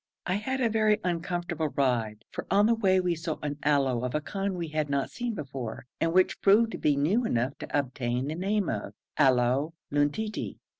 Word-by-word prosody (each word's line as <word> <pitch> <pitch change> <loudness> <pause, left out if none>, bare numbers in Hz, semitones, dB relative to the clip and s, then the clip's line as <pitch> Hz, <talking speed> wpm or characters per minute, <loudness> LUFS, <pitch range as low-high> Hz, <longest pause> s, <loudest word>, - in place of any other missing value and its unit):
I 180 - 0
had 265 +5 -2
a 240 - +4
very 215 -1 +2
uncomfortable 175 -2 -2
ride, 120 -6 0
for - - -6
on 205 +1 +4
the 230 - +4
way 195 -5 +3
we 180 -1 +1
saw 165 -1 -4
an 145 0 -3
aloe 135 -4 +2
of 125 +3 -2
a - - +2
kind 195 +4 -3
we 170 -2 -3
had 155 -1 -1
not 140 -1 -1
seen 240 -2 -3
before, 135 - -6
and 165 - +1
which 185 +2 +2
proved 220 +3 +5
to - - -6
be 150 -1 +2
new 170 - +2
enough 130 - 0
to - - -2
obtain 125 -2 -1
the 150 - -2
name 195 +3 0
of - - -4 0.2
Aloe 135 +3 +3 0.2
Luntii. 145 +10 -1
160 Hz, 200 wpm, -28 LUFS, 135-195 Hz, 0.2 s, proved